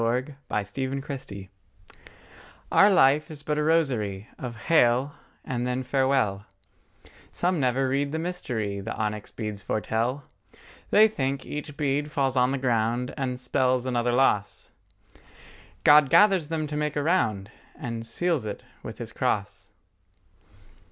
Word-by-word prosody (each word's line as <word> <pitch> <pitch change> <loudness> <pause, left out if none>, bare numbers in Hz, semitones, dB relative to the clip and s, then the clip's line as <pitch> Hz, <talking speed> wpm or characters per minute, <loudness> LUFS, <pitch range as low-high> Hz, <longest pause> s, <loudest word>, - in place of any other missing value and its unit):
LV 125 +5 -1
AVE 120 +6 -2
ATQUE - - -2
VALE 130 -9 -8 1.2
OUR 200 - +6
life 150 -5 +4
is 150 -2 -8
but 150 0 -1
a - - +1
rosary 120 -11 0
Of 120 -2 -6
Hail 130 -2 +3 0.3
and 125 -1 -2
then 125 +1 -2
Farewell; 130 -7 +1 0.9
Some 180 -1 0
never 130 0 +1
read 140 +2 0
the 160 - -2
mystery 125 - -3
The 105 +4 -5
onyx 105 -1 -3
beads 105 -2 -5
foretell. 115 +7 -2 0.7
They 215 +1 +6
think 135 -9 -3
each 145 -1 -6
bead 145 0 -1
falls 135 -2 0
on 125 0 +3
the 135 - -1
ground 120 -1 0
And 130 -3 -3
spells 130 0 +1
another 120 -1 0
loss: 120 -5 +1 1.1
God 150 -2 +7
gathers 195 -5 +5
them 155 -1 -2
to 150 0 -5
make 150 0 -1
a 145 - 0
round 110 - 0 0.2
And 115 -3 -5
seals 145 +1 -1
it 105 - -6 0.2
with - - -8
His - - -7
cross. - - -2
130 Hz, 140 wpm, -26 LUFS, 115-150 Hz, 1.2 s, God